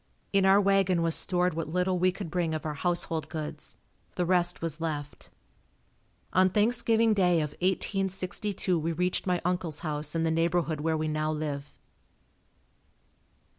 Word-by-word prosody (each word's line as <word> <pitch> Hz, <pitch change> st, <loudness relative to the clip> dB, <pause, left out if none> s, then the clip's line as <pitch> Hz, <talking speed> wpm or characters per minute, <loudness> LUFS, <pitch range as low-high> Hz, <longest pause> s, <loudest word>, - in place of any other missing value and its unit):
In 195 Hz, -1 st, +4 dB
our 195 Hz, +1 st, +6 dB
wagon 195 Hz, -3 st, +2 dB
was 165 Hz, -1 st, +3 dB
stored 180 Hz, 0 st, +2 dB
what 165 Hz, -1 st, -3 dB
little 180 Hz, +2 st, 0 dB
we 185 Hz, +1 st, +3 dB
could 180 Hz, -2 st, -7 dB
bring 170 Hz, -2 st, 0 dB
of 155 Hz, -, -5 dB
our 155 Hz, -, -2 dB
household 165 Hz, -1 st, -1 dB
goods, 155 Hz, -1 st, -7 dB, 0.4 s
the 180 Hz, -, 0 dB
rest 175 Hz, 0 st, +1 dB
was 165 Hz, -1 st, -4 dB
left. 145 Hz, -3 st, -5 dB, 1.0 s
On 185 Hz, +1 st, +5 dB
Thanksgiving 225 Hz, +2 st, +2 dB
day 180 Hz, -4 st, +3 dB
of 150 Hz, -2 st, -2 dB
1862 190 Hz, 0 st, -1 dB
we 165 Hz, +2 st, -1 dB
reached 180 Hz, +3 st, -1 dB
my 180 Hz, -1 st, +1 dB
uncle's 175 Hz, -4 st, -1 dB
house 150 Hz, -1 st, -3 dB
in 165 Hz, -, +1 dB
the 165 Hz, -, +1 dB
neighborhood 165 Hz, -1 st, 0 dB
where 160 Hz, +1 st, 0 dB
we 155 Hz, 0 st, -1 dB
now 155 Hz, 0 st, -1 dB
live. 150 Hz, -2 st, -4 dB
175 Hz, 155 wpm, -28 LUFS, 155-185 Hz, 1.0 s, our